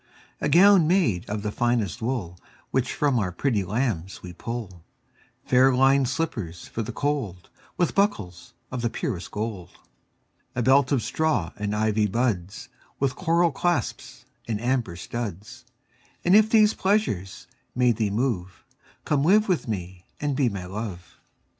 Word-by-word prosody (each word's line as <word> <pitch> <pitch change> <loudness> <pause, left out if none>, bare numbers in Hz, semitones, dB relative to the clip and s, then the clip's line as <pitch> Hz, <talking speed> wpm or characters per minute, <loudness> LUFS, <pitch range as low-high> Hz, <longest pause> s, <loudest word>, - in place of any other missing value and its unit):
A - - 0
gown 185 -1 +6
made 165 - +1
of 105 0 -3
the 105 - -2
finest 120 -5 0
wool 110 -8 -3 0.3
Which 130 -1 0
from 140 -5 +1
our 95 -4 -1
pretty 110 +1 0
lambs 95 -4 -2
we 90 -1 -8
pull; 95 -4 -6 0.6
Fair 130 +1 +5
linèd 135 +1 +4
slippers 120 - -3
for 115 - -4
the 110 - -4
cold, 135 -12 -3
15 - - -31 0.2
With 175 - +1
buckles 95 - -1 0.2
of 130 -1 -3
the 120 - 0
purest 115 - -4
gold. 105 -5 -5 0.8
A 120 - 0
belt 130 +2 +4
of 130 -6 +2
straw 155 - 0
and 105 0 -3
ivy 110 0 +1
buds 100 -4 -2 0.3
With 135 -2 0
coral 170 -1 +2
clasps 175 +5 -2 0.2
and 110 -3 -2
amber 120 -6 -1
studs: 115 +5 -6 0.6
And 180 +3 +5
if 215 0 +6
these 215 -1 +5
pleasures 190 - -1 0.3
may 125 0 +4
thee 110 -2 0
move, 100 -5 -2 0.4
Come 145 -2 +1
live 210 +6 +4
with 180 -9 0
me 90 -4 -5
and 145 -2 -1
be 130 -3 +2
my 100 -4 -6
Love. 95 -2 -7
120 Hz, 155 wpm, -25 LUFS, 95-140 Hz, 0.8 s, gown